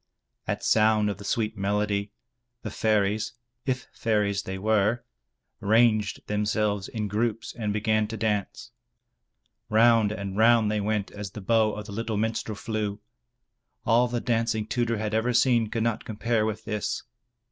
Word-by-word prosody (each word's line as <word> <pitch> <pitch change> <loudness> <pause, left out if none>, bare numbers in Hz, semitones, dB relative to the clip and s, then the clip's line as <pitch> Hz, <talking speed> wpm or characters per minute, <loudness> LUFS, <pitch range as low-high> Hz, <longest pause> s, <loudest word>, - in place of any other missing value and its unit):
At - - -2
sound 110 -1 +3
of 100 - -7
the - - -8
sweet 110 +1 -1
melody, 100 +1 0 0.5
the 110 - -4
fairies 110 +1 +1 0.3
(if 130 -1 -1
fairies 105 -3 0
they 95 -1 -5
were) 110 +3 +1 0.6
ranged 110 -1 +2
themselves 105 -1 0
in 110 -2 -3
groups 110 +2 -2
and 110 -3 -2
began 110 +1 +1
to 110 +1 -6
dance. 105 -2 -2 1.0
Round 110 -1 +5
and 100 -2 -5
round 110 0 +4
they 105 -1 0
went 105 -1 -1
as 105 -1 -6
the 105 - -9
bow 110 +1 +2
of 105 0 -6
the 105 - -9
little 110 +1 -3
minstrel 110 0 -2
flew. 105 -1 -3 0.9
All 120 +2 +4
the 120 0 -2
dancing 115 -2 0
Tudur 115 0 0
had 105 0 -3
ever 115 +3 +1
seen 120 -2 +3
could 115 -1 -1
not 115 -2 -1
compare 110 0 0
with 110 0 -4
this. 105 -2 -2
110 Hz, 155 wpm, -26 LUFS, 105-115 Hz, 1.0 s, Round